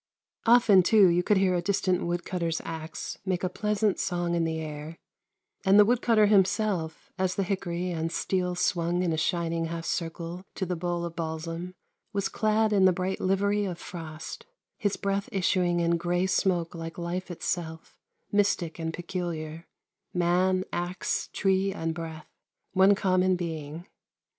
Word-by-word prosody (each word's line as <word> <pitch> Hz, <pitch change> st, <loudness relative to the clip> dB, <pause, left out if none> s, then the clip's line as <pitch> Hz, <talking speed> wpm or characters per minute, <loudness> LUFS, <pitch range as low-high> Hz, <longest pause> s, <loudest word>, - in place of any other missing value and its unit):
Often, 230 Hz, -5 st, +7 dB
too, 200 Hz, 0 st, +6 dB
you 175 Hz, +1 st, +3 dB
could 205 Hz, +3 st, +2 dB
hear 190 Hz, -1 st, +3 dB
a 175 Hz, -, +1 dB
distant 185 Hz, 0 st, +1 dB
woodcutter's 170 Hz, -1 st, -2 dB
axe 160 Hz, 0 st, -6 dB
make 185 Hz, -2 st, -1 dB
a 185 Hz, -, +1 dB
pleasant 210 Hz, +1 st, 0 dB
song 175 Hz, -1 st, -1 dB
in 170 Hz, -1 st, +1 dB
the 160 Hz, 0 st, -2 dB
air, 155 Hz, +1 st, -6 dB, 0.7 s
and 195 Hz, 0 st, +5 dB
the 210 Hz, -, +8 dB
wood 240 Hz, +2 st, +2 dB
cutter 220 Hz, -3 st, +4 dB
himself, 195 Hz, -4 st, +1 dB
as 185 Hz, -1 st, +1 dB
the 195 Hz, -, +1 dB
hickory 180 Hz, -2 st, -2 dB
and 165 Hz, -1 st, -2 dB
steel 180 Hz, +1 st, -1 dB
swung 175 Hz, 0 st, +1 dB
in 170 Hz, -2 st, +1 dB
a -, -, +1 dB
shining 165 Hz, 0 st, 0 dB
half 165 Hz, 0 st, -5 dB
circle 170 Hz, +1 st, -3 dB
to 190 Hz, -, -2 dB
the 180 Hz, 0 st, -2 dB
bole 175 Hz, 0 st, -2 dB
of 170 Hz, -1 st, -6 dB
balsam, 165 Hz, +2 st, -4 dB, 0.4 s
was 200 Hz, -1 st, 0 dB
clad 215 Hz, 0 st, +2 dB
in 195 Hz, -2 st, +5 dB
the 185 Hz, -, +7 dB
bright 185 Hz, +2 st, -2 dB
livery 200 Hz, +2 st, +1 dB
of 180 Hz, -3 st, -4 dB
frost, 165 Hz, -, -8 dB, 0.3 s
his 205 Hz, -1 st, 0 dB
breath 200 Hz, 0 st, -1 dB
issuing 180 Hz, -2 st, +1 dB
in 170 Hz, 0 st, +2 dB
gray 175 Hz, +2 st, 0 dB
smoke 180 Hz, -3 st, +1 dB
like 165 Hz, -1 st, -7 dB
life 175 Hz, +2 st, -4 dB
itself, 165 Hz, -2 st, -4 dB, 0.4 s
mystic 195 Hz, -5 st, +1 dB
and 165 Hz, 0 st, -3 dB
peculiar, 170 Hz, -2 st, -5 dB, 0.5 s
man, 180 Hz, +2 st, +2 dB
axe, 175 Hz, +1 st, -2 dB
tree, 195 Hz, 0 st, +1 dB
and 165 Hz, -4 st, -2 dB
breath, 160 Hz, -1 st, -7 dB, 0.5 s
one 190 Hz, +1 st, +6 dB
common 185 Hz, -2 st, +2 dB
being. 160 Hz, -1 st, -5 dB
180 Hz, 160 wpm, -28 LUFS, 165-190 Hz, 0.7 s, the